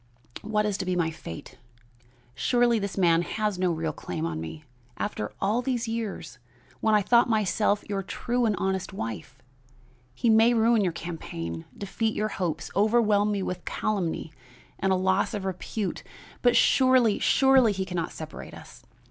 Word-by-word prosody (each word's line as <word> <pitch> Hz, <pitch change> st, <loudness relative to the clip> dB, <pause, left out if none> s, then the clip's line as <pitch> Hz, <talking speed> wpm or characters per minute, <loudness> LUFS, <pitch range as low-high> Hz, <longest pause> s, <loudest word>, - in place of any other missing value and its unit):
What 210 Hz, 0 st, 0 dB
is 205 Hz, -1 st, -1 dB
to 190 Hz, -, -2 dB
be 185 Hz, 0 st, 0 dB
my 165 Hz, -2 st, +1 dB
fate? 120 Hz, -, -10 dB, 0.7 s
Surely 240 Hz, -, +2 dB
this 200 Hz, -1 st, -4 dB
man 170 Hz, -3 st, +4 dB
has 210 Hz, +1 st, -2 dB
no 180 Hz, -1 st, +2 dB
real 160 Hz, -1 st, -2 dB
claim 85 Hz, -, -5 dB
on 80 Hz, -1 st, -3 dB
me, 80 Hz, -, -7 dB, 0.3 s
after 105 Hz, -, -3 dB
all 210 Hz, +5 st, +1 dB
these 245 Hz, -2 st, -2 dB
years, 220 Hz, -, -5 dB, 0.4 s
when 220 Hz, -1 st, +3 dB
I 210 Hz, -, +3 dB
thought 240 Hz, +3 st, +4 dB
myself 210 Hz, -1 st, +1 dB
your 200 Hz, -1 st, -2 dB
true 240 Hz, +5 st, -1 dB
and 210 Hz, -, +1 dB
honest 190 Hz, 0 st, -2 dB
wife. 115 Hz, -, -6 dB, 0.8 s
He -, -, -1 dB
may 225 Hz, +2 st, +5 dB
ruin 225 Hz, 0 st, +4 dB
your 180 Hz, -, +1 dB
campaign, 85 Hz, -, -6 dB
defeat 220 Hz, +2 st, -2 dB
your 215 Hz, 0 st, -1 dB
hopes, 170 Hz, -6 st, -3 dB
overwhelm 210 Hz, 0 st, +3 dB
me 200 Hz, -2 st, -1 dB
with 180 Hz, -1 st, -4 dB
calumny 180 Hz, -6 st, -2 dB, 0.5 s
and 195 Hz, -, +1 dB
a -, -, +4 dB
loss 190 Hz, +4 st, +1 dB
of 200 Hz, -2 st, -4 dB
repute, 190 Hz, +2 st, -3 dB, 0.4 s
but 245 Hz, -1 st, +4 dB
surely, 255 Hz, -5 st, +4 dB
surely 265 Hz, -4 st, +4 dB
he 190 Hz, -1 st, -2 dB
can 180 Hz, -1 st, -6 dB
not 170 Hz, 0 st, -2 dB
separate 155 Hz, -1 st, -9 dB
us. -, -, -13 dB
200 Hz, 165 wpm, -26 LUFS, 175-220 Hz, 0.8 s, may